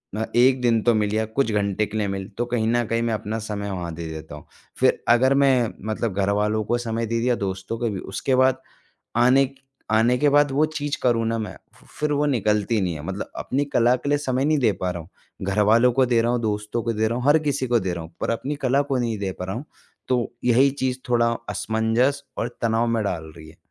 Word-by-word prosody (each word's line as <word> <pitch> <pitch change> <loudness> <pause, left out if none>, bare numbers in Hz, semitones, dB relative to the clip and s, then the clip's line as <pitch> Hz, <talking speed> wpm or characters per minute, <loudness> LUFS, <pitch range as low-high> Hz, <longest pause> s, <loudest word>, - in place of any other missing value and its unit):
म 110 +1 -1
1 130 +2 +5
दिन 115 -2 +3
तो 120 - +4
मिल 105 -1 0
या 110 +1 +1
कुछ 115 +2 -1
घंटे 105 0 0
के 105 +1 -6
लिए 105 -2 0
मिल, 95 -1 -4
तो 120 - 0
कहीं 120 -2 -1
न 120 +1 +2
कहीं 115 0 0
मैं 115 -1 0
अपना 110 +1 -3
समय 105 -2 -4
वहाँ 85 -3 -4
दे 85 0 -6
देता 80 -1 -8
हूँ। 75 - -12 0.3
फिर - - +2
अगर 130 +3 +5
मैं 135 -4 +3
मतलब 110 -1 -2
घरवालों 105 +2 +1
को 120 +3 0
समय 115 -1 -2
दे 115 +1 -1
दिया, 125 +1 +2
दोस्तों 95 +2 -4
को 120 - 0
भी, 100 -3 -4
उसके 130 +7 -2
बाद 130 0 +3 0.6
आने 130 +3 +5
क 135 - -16 0.4
आने 115 +3 +4
के 150 - +3
बाद 145 0 +4
वो 145 +3 +3
चीज़ 145 -2 -3
करूँ 115 -2 +2
ना 115 - 0
मैं 110 -1 -5 0.2
फि - - -21
फिर 150 0 0
वो 145 +1 +1
निकलती 105 -4 +1
नहीं 90 -3 -1
है, 75 - -7
मतलब 95 +3 -5
अपनी 140 +3 -1
कला 120 +1 +4
के 130 +3 -6
लिए 145 0 +2
समय 130 -2 -1
नहीं 155 +1 +2
दे 115 -6 +3
पा 90 - 0
रहा 90 -1 -5
हूँ। 80 - -12 0.4
घरवालों 110 +5 +4
को 130 +1 +3
दे 120 -1 +3
रहा 120 +1 +1
हूँ, 120 - 0
दोस्तों 105 +1 -2
को 115 +1 -1
दे 110 0 0
रहा 120 +2 -2
हूँ, 125 - -4
हर 145 +2 +6
किसी 145 -4 -1
को 120 -2 +2
दे 95 -1 -2
रहा 85 - -5
हूँ 80 - -13
पर - - -1
अपनी 130 +5 -2
कला 135 +2 +3
को 135 - +1
नहीं 115 -3 -1
दे 95 -2 -3
पा 90 - -4
रहा 95 - -4
हूँ। 130 - -6 0.4
तो 125 -2 0
यही 125 +3 +4
चीज़ 130 -2 -2
थोड़ा 115 -1 +3 0.2
असमंजस 115 +6 0 0.2
और 115 - -1
तनाव 115 +1 +2
में 115 -1 0
डाल 80 -5 -4
रही 80 -1 -12
है। 80 - -16
115 Hz, 250 wpm, -23 LUFS, 105-125 Hz, 0.6 s, हर